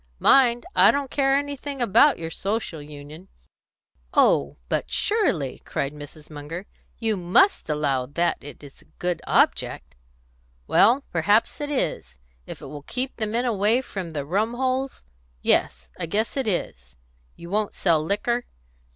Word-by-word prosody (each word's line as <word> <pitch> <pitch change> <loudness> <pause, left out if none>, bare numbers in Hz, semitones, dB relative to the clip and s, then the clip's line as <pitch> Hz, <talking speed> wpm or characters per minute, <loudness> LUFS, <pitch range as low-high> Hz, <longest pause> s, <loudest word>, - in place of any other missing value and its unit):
Mind, 240 - +4
I - - +7
don't 280 -2 0
care 270 -1 +2
anything 285 0 -3
about 240 +5 +4
your 165 -1 -6
Social 195 -6 -3
Union." 150 +4 -11 0.9
"Oh, 70 0 +3
but - - -1
surely!" 175 - 0
cried 140 +1 -3
Mrs. 150 +1 -11
Munger, 155 +5 -7 0.3
"you 225 -2 0
must 190 - +3
allow 140 -4 0
that 170 +5 0
it's 145 0 -12
a - - -22
good 175 -2 -2
object." 65 0 +1 0.7
"Well, 245 - +4
perhaps 205 - +2
it 290 - -3
is, 70 - -2 0.3
if - - -8
it - - -7
will 145 -1 -8
keep 255 - -4
the 215 - -1
men 235 +4 -1
away 220 +1 +2
from 190 -8 -6
the 145 -3 -4
rum 210 +9 0
holes. 260 - -2 0.4
Yes, - - +1
I 170 - -3
guess 215 +7 -1
it 270 -4 -1
is. 65 - -3 0.4
You 170 +1 -11
won't 210 0 0
sell 165 -4 +2
liquor?" 235 +7 -1
195 Hz, 150 wpm, -24 LUFS, 150-245 Hz, 0.9 s, I